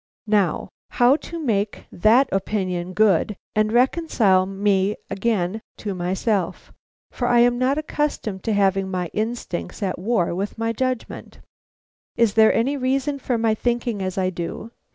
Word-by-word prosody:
Now, 205 -6 +1 0.2
how 245 +3 +4
to 335 - -8
make 210 -8 -1
that 230 +8 +4
opinion 185 -2 -2
good, 205 0 +2 0.2
and 215 0 +2
reconcile 240 - +3
me 195 0 +1 0.2
again 200 -1 -1 0.2
to 205 -2 -4
myself; 185 +1 -2 0.4
for 245 - -2
I 240 -1 +5
am 245 0 +3
not 260 +3 +2
accustomed 295 -10 -2
to 225 - +1
have 195 -1 +3
my 185 -3 -3
instincts 220 -3 -4
at 185 -3 -2
war 190 -3 0
with 195 +5 -4
my 225 0 -1
judgment. 255 0 -4 0.8
Is 230 -4 +3
there 220 0 +6
any 270 +5 +1
reason 275 +2 -1
for 250 -2 -1
my 225 -1 +2
thinking 235 -2 -1
as 185 +1 -3
I 185 -1 +1
do? 175 +6 -6
215 Hz, 150 wpm, -22 LUFS, 190-240 Hz, 0.8 s, there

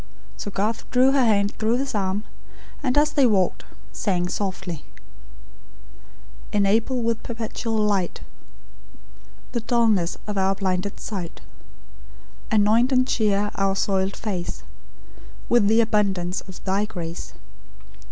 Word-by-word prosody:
So - - -5
Garth 210 +3 -2
drew 255 +2 +5
her 270 -1 +3
hand 205 -3 +2
through 225 +2 +2
his 275 +1 -2
arm; 200 0 -1 0.6
and, 260 -2 0
as 300 +1 +3
they 275 -4 +5
walked, 195 -5 +1 0.3
sang 180 -3 -1
softly: 190 -5 -3 1.7
"Enable 220 +5 +2
with 230 -1 0
perpetual 225 -1 -4
light, 205 -4 0 1.3
The 240 - -1
dulness 220 -7 +2
of 210 -2 -2
our 190 +1 +2
blinded 190 0 -2
sight; 185 -6 -6 1.1
Anoint 220 +4 +4
and 255 -1 +3
cheer 210 -3 +1
our 195 0 +1
soiled 195 0 0
face 190 -6 -4 0.9
With 235 -4 +4
the 225 +2 +5
abundance 195 -5 0
of 190 - -11
Thy 195 +2 +1
grace. 170 -5 -6
205 Hz, 120 wpm, -24 LUFS, 190-230 Hz, 1.7 s, drew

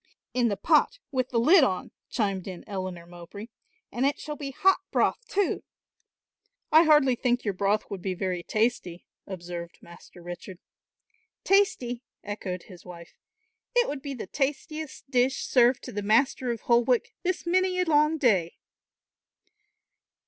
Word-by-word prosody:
"In 245 -1 +2
the 200 -3 -1
pot, - - +3
with 255 -2 -1
the 240 - -1
lid 310 +8 +6
on," 185 -6 -1 0.2
chimed 195 -5 -1
in 185 -2 -7
Eleanor 185 -4 -5
Mowbray, 175 +6 -10 0.4
"and 240 - -2
it 280 +1 +2
shall 300 -1 -6
be 285 -2 -6
hot 380 +8 +3
broth - - +1
too." 400 -1 0 1.1
"I 320 +2 +7
hardly 295 -4 +5
think 245 0 0
your 205 - 0
broth 200 +3 +1
would 195 -2 -5
be 185 0 -2
very 180 -1 -2
tasty," 215 -3 -1 0.2
observed 175 -2 -7
Master 170 0 -15
Richard. 175 +1 -8 0.9
"Tasty," 260 -12 +2 0.2
echoed 190 -3 -5
his 180 -4 -14
wife; 170 -2 -12 0.6
"it 485 -1 +4
would 285 -2 -4
be 280 -1 -5
the 235 - -6
tastiest 290 +6 -4
dish 255 +1 +1
served 245 0 +3
to - - -7
the 205 - -3
Master 245 +4 +2
of 235 -2 -3
Holwick 240 0 +2
this 365 -1 -2
many 365 +1 +1
a 365 - +2
long 305 0 +3
day." 195 - +2
235 Hz, 150 wpm, -27 LUFS, 185-285 Hz, 1.1 s, I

